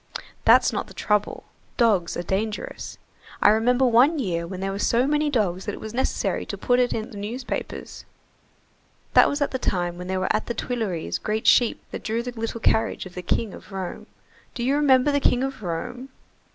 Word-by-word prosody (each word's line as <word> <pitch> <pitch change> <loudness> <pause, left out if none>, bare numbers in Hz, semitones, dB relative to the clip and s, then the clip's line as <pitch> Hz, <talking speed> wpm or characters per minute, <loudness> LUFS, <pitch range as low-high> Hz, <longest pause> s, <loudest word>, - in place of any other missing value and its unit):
"That's - - +6
not - - -2
the - - -14
trouble, 210 -1 0 0.3
dogs 210 -8 +2
are 175 - -3
dangerous. 210 +4 -3 0.4
I - - +6
remember 245 +4 +3
one 255 +7 +5
year 170 - -2
when 185 +1 -6
there 195 +1 -2
were 195 - -4
so 235 +4 +2
many 300 +1 +1
dogs 195 -8 0
that 205 - -3
it - - -10
was 220 0 -7
necessary 260 +2 -1
to - - -5
put 245 0 +2
it 250 -1 +2
in 220 +2 -3
the 210 - -9
newspapers. 235 +5 -5 1.1
That - - +7
was 285 +1 -3
at - - -2
the 260 - -2
time 175 -5 -1
when 180 - -6
there 190 0 -1
were 185 - +1
at - - -2
the 235 - -3
Tuileries 215 -9 -2
great 215 0 -2
sheep 240 -2 +4
that - - -6
drew 225 +2 -1
the 245 - -4
little 230 0 -4
carriage 220 - +1
of 185 - -10
the 180 - -5
King 210 +3 -1
of - - -13
Rome. 190 -2 -6 0.5
Do 240 - -3
you 265 +3 +2
remember 285 -1 +4
the 285 - +2
King 250 -2 +2
of 270 -3 -4
Rome?" 245 +9 -5
225 Hz, 205 wpm, -24 LUFS, 190-250 Hz, 1.1 s, That